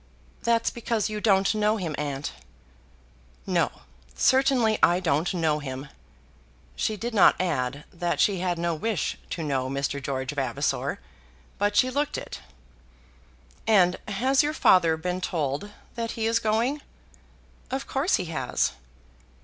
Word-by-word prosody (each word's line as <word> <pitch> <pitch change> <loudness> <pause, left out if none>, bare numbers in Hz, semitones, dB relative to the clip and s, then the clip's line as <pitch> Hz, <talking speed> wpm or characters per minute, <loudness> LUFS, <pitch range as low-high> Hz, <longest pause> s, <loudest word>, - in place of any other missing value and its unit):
"That's 230 -1 +2
because 230 -3 -1
you 210 0 -4
don't 195 -2 +3
know 215 +1 +2
him, 170 -6 -3
aunt." 145 -1 -4 1.1
"No; - - +2 0.5
certainly 255 - +3
I 175 +1 +5
don't 165 -2 +1
know 160 -5 +1
him." 135 0 -6 0.9
She 215 - -1
did 235 +3 -4
not 205 - +5
add 145 -6 -1
that 175 -1 -2
she 195 -3 +3
had 175 -1 -1
no 170 0 0
wish 210 +5 -2
to 165 - -4
know 135 -3 -1
Mr. 140 +1 -2
George 135 0 -3
Vavasor, 135 -5 -1 0.6
but 205 +1 +1
she 255 +5 +4
looked 285 +2 -1
it. - - -7 1.3
"And 185 -5 +4
has 255 +7 +2
your 300 +1 0
father 170 - +4
been 180 +3 -3
told 155 +1 -2 0.2
that 230 -1 -3
he 225 - -2
is 225 0 +2
going?" 230 +7 0 0.9
"Of 265 +1 -3
course 280 +8 +1
he 185 - -2
has." 165 -1 -1
185 Hz, 140 wpm, -26 LUFS, 150-225 Hz, 1.3 s, I